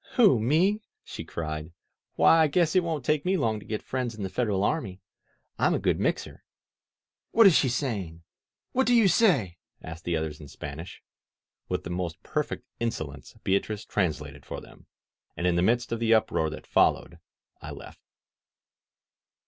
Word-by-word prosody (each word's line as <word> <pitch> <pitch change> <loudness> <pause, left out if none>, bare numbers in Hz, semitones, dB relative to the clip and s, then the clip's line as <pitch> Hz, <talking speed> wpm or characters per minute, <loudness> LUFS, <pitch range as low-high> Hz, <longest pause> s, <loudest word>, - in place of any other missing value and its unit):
"Who, 205 - +6
me?" 170 - +2 0.2
she - - -7
cried. 75 0 -5 0.4
"Why, 165 - +6
I 160 - +5
guess 165 +2 +1
it 185 - +5
won't 160 -6 -3
take 150 +1 +1
me 190 +1 +1
long 110 -8 0
to - - -14
get 110 -1 -3
friends 125 -3 -3
in 105 - -6
the 95 - -3
Federal 105 -6 0
army. 100 - -1 0.6
I'm - - +3
a - - +2
good - - 0
mixer - - -2 0.4
!" - - -65
"What 230 - +7
is 190 -5 +7
she 130 - +4
saying? 100 - -3 0.5
What 265 +1 +1
do 245 - +5
you 225 -4 +6
say?" 145 - +3 0.2
asked 80 0 -9
the 85 -1 0
others 80 -1 -4
in 75 - -10
Spanish. 75 +5 -8 0.7
With - - -2
the 85 - -6
most 90 -2 -4
perfect - - -3
insolence 75 - -4
Beatrice 100 +2 -1
translated 75 -7 -2
for - - -6
them. - - -16 0.5
And 85 - -2
in 90 -1 +3
the 85 - +2
midst 120 +6 +1
of 115 - -1
the 115 -1 +4
uproar 80 -7 +1
that 75 - -9
followed - - +2 0.4
I - - -8
left. - - -10
110 Hz, 175 wpm, -27 LUFS, -, 0.7 s, What